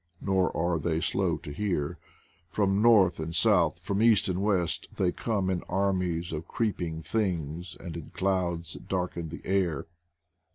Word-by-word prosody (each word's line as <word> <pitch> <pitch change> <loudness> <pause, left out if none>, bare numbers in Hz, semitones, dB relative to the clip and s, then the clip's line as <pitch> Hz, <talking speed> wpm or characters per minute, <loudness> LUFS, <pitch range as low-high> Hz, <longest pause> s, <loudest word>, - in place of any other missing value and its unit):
Nor 95 -3 +1
are 85 0 +1
they 80 +1 0
slow - - 0
to - - -9
hear. 80 -3 -2 0.5
From 100 +1 +1
north 105 -7 +5
and 80 +1 -4
south, 90 -4 +4
from 100 +3 -1
east 110 -2 +5
and 95 0 -1
west, 90 -6 +1
they 90 -2 +2
come 100 -3 -1
in 95 -2 0
armies 90 -3 0
of 80 +1 -5
creep 110 -5 -1
ing 80 -1 -3
things 85 -5 -2
and 85 -3 -7
in 85 -3 -7
clouds 90 -3 -1
that - - -11
darken 90 -3 -2
the 85 - -9
air. 90 -7 0
90 Hz, 165 wpm, -28 LUFS, 85-100 Hz, 0.5 s, north